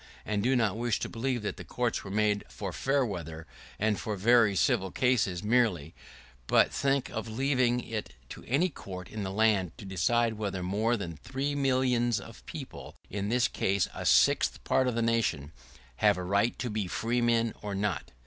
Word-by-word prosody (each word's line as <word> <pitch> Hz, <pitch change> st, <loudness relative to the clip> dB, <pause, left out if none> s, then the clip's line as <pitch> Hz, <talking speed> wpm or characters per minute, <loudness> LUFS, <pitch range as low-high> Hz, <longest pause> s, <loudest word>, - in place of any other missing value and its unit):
I 105 Hz, -, -2 dB
do 125 Hz, +6 st, +2 dB
not 110 Hz, -4 st, +1 dB
wish 120 Hz, -2 st, 0 dB
to -, -, -3 dB
believe 120 Hz, 0 st, -2 dB
that 105 Hz, -, -3 dB
the -, -, -7 dB
courts 120 Hz, -2 st, -2 dB
were 100 Hz, -, -8 dB
made 105 Hz, 0 st, +1 dB
for 95 Hz, -4 st, -6 dB
fair 135 Hz, 0 st, +1 dB
weather, 80 Hz, -6 st, -6 dB, 0.3 s
and 105 Hz, -1 st, 0 dB
for 105 Hz, -, -3 dB
very 110 Hz, +1 st, +4 dB
civil 95 Hz, +1 st, +2 dB
cases 105 Hz, -5 st, +1 dB
merely; 105 Hz, -9 st, +1 dB, 0.5 s
but -, -, +4 dB
think 140 Hz, -1 st, 0 dB
of 110 Hz, 0 st, -4 dB
leaving 125 Hz, +1 st, +1 dB
it 110 Hz, -, -6 dB
to -, -, -9 dB
any 150 Hz, +9 st, +2 dB
court 90 Hz, -, -9 dB
in 110 Hz, -, -5 dB
the 95 Hz, -, -3 dB
land 100 Hz, -4 st, +1 dB
to -, -, -10 dB
decide 110 Hz, +4 st, +1 dB
whether 95 Hz, -3 st, -3 dB
more 110 Hz, +6 st, +1 dB
than 85 Hz, -6 st, -6 dB
three 135 Hz, -, -3 dB
millions 130 Hz, -4 st, +1 dB
of -, -, -12 dB
people, -, -, -8 dB, 0.2 s
in 100 Hz, +1 st, -2 dB
this 120 Hz, +1 st, +3 dB
case 95 Hz, -1 st, 0 dB
a -, -, -4 dB
sixth -, -, +3 dB
part 130 Hz, -, +2 dB
of 120 Hz, -2 st, -1 dB
a 115 Hz, -, +1 dB
nation, 110 Hz, -11 st, 0 dB, 0.5 s
have 105 Hz, -2 st, +4 dB
a 90 Hz, -, -4 dB
right 100 Hz, +6 st, +1 dB
to 120 Hz, -, -3 dB
be 105 Hz, -3 st, -2 dB
freemen 115 Hz, +2 st, +1 dB
or 100 Hz, -1 st, -4 dB
not! 100 Hz, 0 st, -2 dB
110 Hz, 185 wpm, -29 LUFS, 100-120 Hz, 0.5 s, very